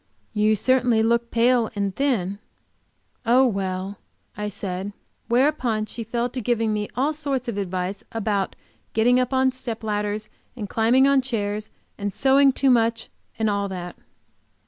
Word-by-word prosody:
"You 215 Hz, 0 st, +3 dB
certainly 245 Hz, 0 st, +3 dB
look 235 Hz, +1 st, +1 dB
pale 235 Hz, -1 st, +3 dB
and 200 Hz, -2 st, -1 dB
thin." 205 Hz, -9 st, 0 dB, 0.8 s
"Oh, 250 Hz, +3 st, +5 dB
well," 195 Hz, -3 st, -2 dB, 0.4 s
I 210 Hz, 0 st, -3 dB
said, 195 Hz, 0 st, -5 dB, 0.4 s
whereupon 245 Hz, -4 st, +2 dB
she 230 Hz, +2 st, -5 dB
fell 235 Hz, +2 st, -1 dB
to 255 Hz, +1 st, -5 dB
giving 225 Hz, -1 st, +1 dB
me 210 Hz, 0 st, -2 dB
all 280 Hz, +5 st, +1 dB
sorts 275 Hz, -4 st, -2 dB
of 235 Hz, -, -2 dB
advice 190 Hz, 0 st, -3 dB
about 210 Hz, -3 st, -1 dB, 0.4 s
getting 245 Hz, +3 st, +4 dB
up 255 Hz, 0 st, 0 dB
on 260 Hz, 0 st, +3 dB
step 240 Hz, -3 st, -6 dB
ladders, 210 Hz, 0 st, -2 dB, 0.3 s
and 215 Hz, -4 st, -5 dB
climbing 235 Hz, +6 st, +4 dB
on 275 Hz, -1 st, +4 dB
chairs, 215 Hz, -4 st, -3 dB, 0.3 s
and 205 Hz, 0 st, -2 dB
sewing 270 Hz, +5 st, +4 dB
too 265 Hz, 0 st, +2 dB
much 230 Hz, -1 st, +2 dB, 0.3 s
and 220 Hz, -1 st, +1 dB
all 200 Hz, -1 st, 0 dB
that. 180 Hz, -2 st, -6 dB
225 Hz, 150 wpm, -24 LUFS, 205-250 Hz, 0.8 s, Oh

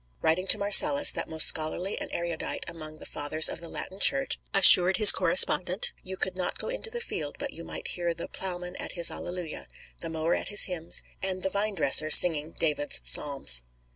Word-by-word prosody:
Writing 170 Hz, +4 st, -2 dB
to 210 Hz, -, +5 dB
Marcellus, 215 Hz, +8 st, +5 dB
that -, -, -7 dB
most 160 Hz, -1 st, +3 dB
scholarly 165 Hz, +5 st, -2 dB
and -, -, -9 dB
erudite 170 Hz, -1 st, -6 dB
among 155 Hz, -2 st, -10 dB
the -, -, -13 dB
Fathers 155 Hz, +2 st, +1 dB
of -, -, -6 dB
the 170 Hz, -, -10 dB
Latin 190 Hz, -, -8 dB
Church 275 Hz, +3 st, +2 dB
assured 185 Hz, -1 st, +6 dB
his 215 Hz, -2 st, +10 dB
correspondent 485 Hz, 0 st, 0 dB
"You 190 Hz, 0 st, -11 dB
could 185 Hz, -1 st, -5 dB
not 180 Hz, -1 st, -6 dB
go -, -, -6 dB
into -, -, -6 dB
the 475 Hz, +1 st, -8 dB
field 150 Hz, -, -7 dB
but -, -, -8 dB
you 165 Hz, -, -11 dB
might -, -, -9 dB
hear 175 Hz, -1 st, -5 dB
the 170 Hz, 0 st, -9 dB
ploughman 180 Hz, -1 st, -6 dB
at -, -, -9 dB
his 170 Hz, -1 st, -2 dB
Hallelujah, 175 Hz, -3 st, -9 dB, 0.3 s
the 165 Hz, -, -9 dB
mower 160 Hz, +1 st, -4 dB
at -, -, -4 dB
his 205 Hz, -, +2 dB
hymns, 175 Hz, -3 st, -5 dB, 0.2 s
and 185 Hz, -1 st, -6 dB
the 190 Hz, -, -4 dB
vine 205 Hz, +1 st, -4 dB
dresser 155 Hz, -1 st, +3 dB
singing 155 Hz, -1 st, +6 dB
David's 145 Hz, -, -3 dB
Psalms." 60 Hz, -, +1 dB
175 Hz, 200 wpm, -24 LUFS, 160-190 Hz, 0.3 s, his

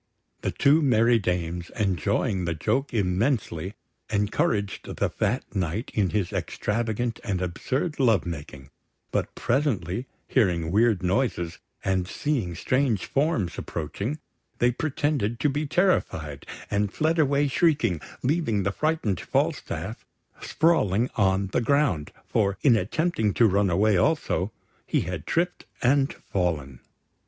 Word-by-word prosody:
The -, -, -1 dB
two 150 Hz, +4 st, +4 dB
merry 120 Hz, -4 st, +4 dB
dames, 90 Hz, -2 st, -2 dB
enjoying 95 Hz, -1 st, 0 dB
the 85 Hz, -1 st, -1 dB
joke 110 Hz, -, 0 dB
immensely, 100 Hz, -, 0 dB, 0.3 s
encouraged 105 Hz, -1 st, -1 dB
the -, -, 0 dB
fat -, -, 0 dB
Knight 95 Hz, +5 st, -2 dB
in 100 Hz, -4 st, +2 dB
his 95 Hz, -3 st, -1 dB
extravagant 115 Hz, +2 st, -2 dB
and 100 Hz, -5 st, -1 dB
absurd 130 Hz, -, -2 dB
love 115 Hz, -7 st, +3 dB
making; 75 Hz, -4 st, -7 dB, 0.4 s
but -, -, -1 dB
presently, 120 Hz, -, 0 dB, 0.2 s
hearing 85 Hz, -9 st, +1 dB
weird 105 Hz, -2 st, +3 dB
noises, 90 Hz, -3 st, 0 dB, 0.3 s
and 95 Hz, -1 st, +1 dB
seeing 115 Hz, -, -2 dB
strange 130 Hz, 0 st, +1 dB
forms 140 Hz, -, 0 dB
approaching, 100 Hz, -, -4 dB, 0.4 s
they 120 Hz, 0 st, +3 dB
pretended 140 Hz, -5 st, -1 dB
to 150 Hz, -, +3 dB
be 145 Hz, +2 st, -1 dB
terrified, 80 Hz, -, 0 dB, 0.2 s
and 100 Hz, 0 st, +1 dB
fled 160 Hz, +6 st, +1 dB
away 145 Hz, -1 st, +3 dB
shrieking, 140 Hz, -, +2 dB, 0.2 s
leaving 130 Hz, -, +1 dB
the 95 Hz, -, 0 dB
frightened 150 Hz, -, 0 dB
Falstaff -, -, -2 dB, 0.4 s
sprawling 125 Hz, -, +2 dB
on 95 Hz, -1 st, +2 dB
the -, -, +2 dB
ground, 120 Hz, -, +1 dB
for, 100 Hz, -2 st, +1 dB
in 130 Hz, -5 st, +6 dB
attempting 110 Hz, -, 0 dB
to 120 Hz, -, +5 dB
run 100 Hz, -1 st, +3 dB
away 100 Hz, +3 st, +3 dB
also, 100 Hz, -, +1 dB, 0.4 s
he -, -, +2 dB
had 85 Hz, -3 st, -5 dB
tripped 175 Hz, +2 st, 0 dB, 0.2 s
and 135 Hz, +2 st, +3 dB
fallen. 75 Hz, -9 st, -2 dB
105 Hz, 130 wpm, -26 LUFS, 90-135 Hz, 0.4 s, in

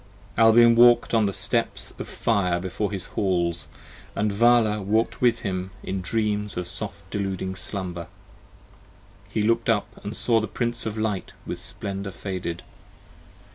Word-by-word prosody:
Albion 115 Hz, +1 st, +7 dB
walk'd 120 Hz, 0 st, +6 dB
on 110 Hz, -3 st, +4 dB
the -, -, 0 dB
steps 100 Hz, +4 st, 0 dB
of -, -, -5 dB
fire 95 Hz, -6 st, 0 dB
before 95 Hz, +3 st, -3 dB
his 95 Hz, -2 st, -4 dB
Halls, 85 Hz, -4 st, 0 dB, 0.5 s
And 105 Hz, +1 st, +1 dB
Vala 110 Hz, -1 st, +4 dB
walk'd 110 Hz, +4 st, +1 dB
with 120 Hz, -2 st, +2 dB
him 95 Hz, -2 st, -3 dB
in 95 Hz, 0 st, -3 dB
dreams 105 Hz, +1 st, -1 dB
of 90 Hz, -, -2 dB
soft -, -, -7 dB
deluding 95 Hz, -2 st, -2 dB
slumber. 90 Hz, -3 st, -4 dB, 1.2 s
35 100 Hz, -, -24 dB
He 110 Hz, -, +2 dB
looked 115 Hz, +2 st, +1 dB
up 105 Hz, -3 st, +2 dB, 0.2 s
& -, -, -6 dB
saw 115 Hz, 0 st, +3 dB
the 110 Hz, -, -2 dB
Prince 120 Hz, -2 st, -1 dB
of 110 Hz, 0 st, -4 dB
Light 110 Hz, -3 st, -2 dB
with -, -, -5 dB
splendor 100 Hz, 0 st, -4 dB
faded. 90 Hz, -3 st, -5 dB
105 Hz, 150 wpm, -25 LUFS, 95-115 Hz, 1.2 s, Albion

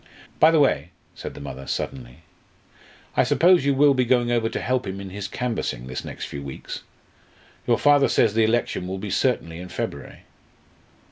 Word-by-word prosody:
"By 155 Hz, -, +7 dB
the 165 Hz, -1 st, +4 dB
way," 90 Hz, -, +2 dB, 0.2 s
said -, -, -8 dB
the -, -, -9 dB
mother, 70 Hz, -1 st, -8 dB
suddenly, -, -, -5 dB, 0.9 s
"I -, -, +4 dB
suppose 175 Hz, -4 st, +4 dB
you 140 Hz, -1 st, +2 dB
will 145 Hz, +1 st, +5 dB
be 130 Hz, -1 st, +2 dB
going 120 Hz, -1 st, +2 dB
over 115 Hz, -2 st, +1 dB
to -, -, -3 dB
help 130 Hz, 0 st, -1 dB
him 95 Hz, +1 st, -5 dB
in 95 Hz, -1 st, -8 dB
his 100 Hz, +1 st, -5 dB
canvassing 115 Hz, -, -3 dB
this 65 Hz, 0 st, -5 dB
next -, -, -6 dB
few 70 Hz, -, -7 dB
weeks? 70 Hz, -1 st, -7 dB, 0.9 s
Your -, -, +4 dB
father 145 Hz, -1 st, +5 dB
says 105 Hz, -, +3 dB
the 115 Hz, 0 st, +3 dB
election 110 Hz, -5 st, 0 dB
will 95 Hz, +1 st, -4 dB
be 100 Hz, +1 st, -5 dB
certainly 90 Hz, -8 st, 0 dB
in 90 Hz, 0 st, -8 dB
February." -, -, -6 dB
110 Hz, 185 wpm, -24 LUFS, 85-130 Hz, 0.9 s, By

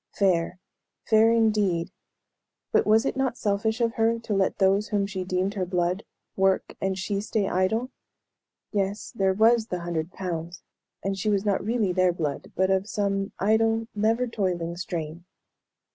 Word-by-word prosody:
Fair, 180 Hz, -3 st, +1 dB, 0.5 s
fair, 220 Hz, +1 st, +5 dB
indeed, 210 Hz, -6 st, +2 dB, 0.8 s
but -, -, +3 dB
was 220 Hz, +1 st, +4 dB
it -, -, -1 dB
not 265 Hz, -2 st, -1 dB
selfish 215 Hz, +3 st, 0 dB
of 230 Hz, -1 st, +1 dB
her 225 Hz, +1 st, +2 dB
to 230 Hz, -2 st, -4 dB
let 195 Hz, -1 st, +1 dB
those 195 Hz, +1 st, +3 dB
whom 205 Hz, -2 st, 0 dB
she 190 Hz, -2 st, -4 dB
deemed 185 Hz, +2 st, -1 dB
her 195 Hz, -3 st, -2 dB
blood, 180 Hz, +2 st, -1 dB, 0.3 s
work, 190 Hz, 0 st, +1 dB
and 190 Hz, -1 st, -1 dB
she 195 Hz, +1 st, -2 dB
stay 210 Hz, -1 st, -1 dB
idle? 220 Hz, +8 st, 0 dB, 0.8 s
Yes, 200 Hz, 0 st, -2 dB
there 195 Hz, -5 st, +1 dB
was 225 Hz, +2 st, +4 dB
the 180 Hz, -4 st, -3 dB
hundred 170 Hz, 0 st, -3 dB
pounds, 175 Hz, -1 st, -5 dB, 0.4 s
and 195 Hz, 0 st, -2 dB
she 215 Hz, -, 0 dB
was 200 Hz, 0 st, +1 dB
not 200 Hz, -2 st, +1 dB
really 215 Hz, -3 st, 0 dB
their 185 Hz, 0 st, +3 dB
blood, 150 Hz, -5 st, -4 dB
but 190 Hz, +1 st, +2 dB
of 190 Hz, +2 st, 0 dB
some 200 Hz, 0 st, -1 dB
idle 225 Hz, +2 st, +2 dB
never 225 Hz, +4 st, +1 dB
toiling 180 Hz, -7 st, -2 dB
strain. 170 Hz, -2 st, -5 dB
195 Hz, 160 wpm, -26 LUFS, 185-220 Hz, 0.8 s, fair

